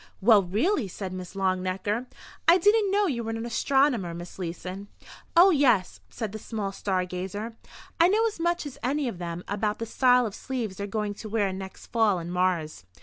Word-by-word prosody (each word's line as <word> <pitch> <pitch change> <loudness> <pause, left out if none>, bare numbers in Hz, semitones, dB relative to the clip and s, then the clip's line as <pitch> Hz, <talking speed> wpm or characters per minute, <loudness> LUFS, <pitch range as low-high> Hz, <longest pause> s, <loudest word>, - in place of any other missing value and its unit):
"Well, 215 0 +6
really!" 220 - 0
said 185 0 -6
Miss 185 0 -7
Longnecker. 190 +4 -1 0.4
"I 340 +2 +8
didn't 415 +3 +4
know 405 +1 +3
you 250 -10 -1
were 225 - -4
an 225 +1 -3
astronomer, 240 -6 +1
Miss 175 +2 -9
Leeson." 185 +3 -5 0.5
"Oh, 370 +3 +8
yes," 245 - +3
said 220 -4 -5
the 215 - -6
small 210 -3 -4
star 190 -2 -1
gazer, 190 +5 -5 0.4
"I 335 - +7
know 430 +5 +3
as 435 -6 -2
much 345 -1 0
as 280 -3 -8
any 280 +2 0
of 195 -7 -5
them 170 0 -5
about 210 +1 -1
the 230 - -4
style 250 +1 +4
of 210 - -4
sleeves 230 -7 -4
they're 200 - -4
going 210 0 -2
to 215 +1 -9
wear 205 -3 0
next 190 0 -8
fall 220 -5 +2
in 170 0 -5
Mars." 180 - 0
210 Hz, 195 wpm, -27 LUFS, 185-255 Hz, 0.5 s, I